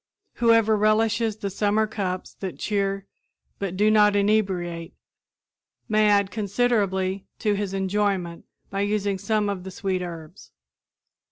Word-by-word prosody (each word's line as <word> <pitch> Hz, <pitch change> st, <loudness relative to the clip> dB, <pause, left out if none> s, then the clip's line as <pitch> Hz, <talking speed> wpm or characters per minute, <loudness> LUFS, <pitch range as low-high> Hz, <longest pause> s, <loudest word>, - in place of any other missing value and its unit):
Whoever 230 Hz, -2 st, +4 dB
relishes 220 Hz, +1 st, +2 dB
the 200 Hz, -2 st, -4 dB
summer 210 Hz, +2 st, +1 dB
cups 190 Hz, -4 st, -4 dB
that 190 Hz, -2 st, -5 dB
cheer 195 Hz, -1 st, -1 dB, 0.5 s
but 190 Hz, -2 st, -3 dB
do 210 Hz, +2 st, +4 dB
not 210 Hz, -1 st, +5 dB
inebriate 190 Hz, -5 st, 0 dB, 0.9 s
may 215 Hz, -1 st, +3 dB
add 200 Hz, -1 st, +3 dB
considerably 200 Hz, -3 st, 0 dB
to 210 Hz, -2 st, +1 dB
his 200 Hz, -1 st, -2 dB
enjoyment 190 Hz, -3 st, -1 dB, 0.3 s
by 195 Hz, 0 st, -1 dB
using 200 Hz, -1 st, 0 dB
some 210 Hz, +1 st, 0 dB
of 200 Hz, -3 st, -3 dB
the 190 Hz, -, -7 dB
sweet 185 Hz, 0 st, -2 dB
herbs. 165 Hz, -3 st, -9 dB
200 Hz, 125 wpm, -24 LUFS, 190-215 Hz, 0.9 s, not